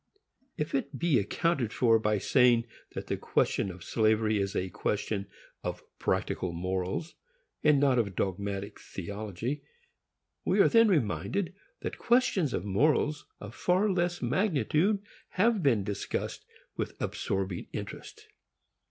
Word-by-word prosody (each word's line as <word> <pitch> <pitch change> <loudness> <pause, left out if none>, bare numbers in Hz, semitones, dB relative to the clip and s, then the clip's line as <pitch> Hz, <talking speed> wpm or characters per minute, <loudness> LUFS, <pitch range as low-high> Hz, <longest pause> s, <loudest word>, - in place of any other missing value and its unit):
If 150 - -2
it 140 0 -1
be 165 -7 +3
accounted 125 - 0
for 115 -2 +4
by 105 -1 +1
saying 120 +2 +4 0.3
that - - -4
the - - -2
question - - +1
of 90 -1 -9
slavery 110 -1 +2
is 100 0 -2
a 95 - -1
question 100 +1 -2 0.4
of - - -4 0.2
practical 90 -2 -1
morals, 95 - -2 0.5
and 150 -2 +5
not 135 -3 +4
of 100 -5 -1
dogmatic 100 +2 -3
theology, 105 - -5 0.8
we - - +1
are - - +7
then 230 -1 +6
reminded 155 - 0 0.3
that - - -5
questions 235 - +3
of 90 - -2
morals 150 +8 +2
of 105 +1 -8
far 190 +4 +2
less 175 -2 0
magnitude 170 - +1 0.3
have 220 +2 +2
been 120 - +3
discussed 100 0 -3 0.3
with - - -4
absorbing 95 -2 -2
interest. - - -7
115 Hz, 130 wpm, -30 LUFS, 100-165 Hz, 0.8 s, are